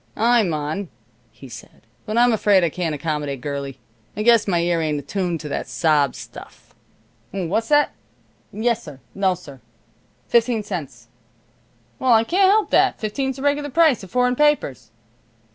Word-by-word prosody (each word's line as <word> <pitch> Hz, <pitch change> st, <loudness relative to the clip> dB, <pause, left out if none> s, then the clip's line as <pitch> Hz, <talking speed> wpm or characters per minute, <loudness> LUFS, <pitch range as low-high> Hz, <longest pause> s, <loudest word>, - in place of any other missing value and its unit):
"I'm 230 Hz, -4 st, +3 dB
on," 155 Hz, +5 st, -3 dB, 0.6 s
said 125 Hz, -, -11 dB
he, -, -, -25 dB, 0.3 s
"but 215 Hz, +2 st, -2 dB
I'm 240 Hz, 0 st, +5 dB
afraid 205 Hz, -3 st, +3 dB
I 170 Hz, -, +2 dB
can't 165 Hz, -3 st, -2 dB
accommodate, 145 Hz, -2 st, -3 dB
girlie. 140 Hz, 0 st, -5 dB, 0.4 s
I 210 Hz, -, -1 dB
guess 230 Hz, -2 st, +4 dB
my 180 Hz, -3 st, +1 dB
ear 170 Hz, -1 st, 0 dB
ain't 155 Hz, -2 st, -1 dB
attuned 175 Hz, +2 st, -3 dB
to 150 Hz, -, -7 dB
that -, -, -4 dB
sob 150 Hz, -5 st, +1 dB
stuff. -, -, -12 dB, 0.6 s
What's 195 Hz, +4 st, -2 dB
that? 295 Hz, -1 st, +3 dB, 0.6 s
Yessir. 220 Hz, -, -2 dB
Nossir, 180 Hz, -9 st, -2 dB, 0.7 s
fifteen 235 Hz, -2 st, +2 dB
cents. 145 Hz, -, -7 dB, 0.9 s
Well, 255 Hz, -2 st, +3 dB
I 225 Hz, 0 st, +5 dB
can't 375 Hz, +9 st, +3 dB
help 425 Hz, +1 st, +2 dB
that; -, -, +3 dB
fifteen's 265 Hz, +5 st, -2 dB
the 270 Hz, -, -8 dB
reg'lar 290 Hz, 0 st, 0 dB
price 300 Hz, -3 st, +3 dB
of 190 Hz, -, -11 dB
foreign 250 Hz, +2 st, +1 dB
papers. 245 Hz, -, +1 dB
195 Hz, 150 wpm, -21 LUFS, 155-245 Hz, 0.9 s, I'm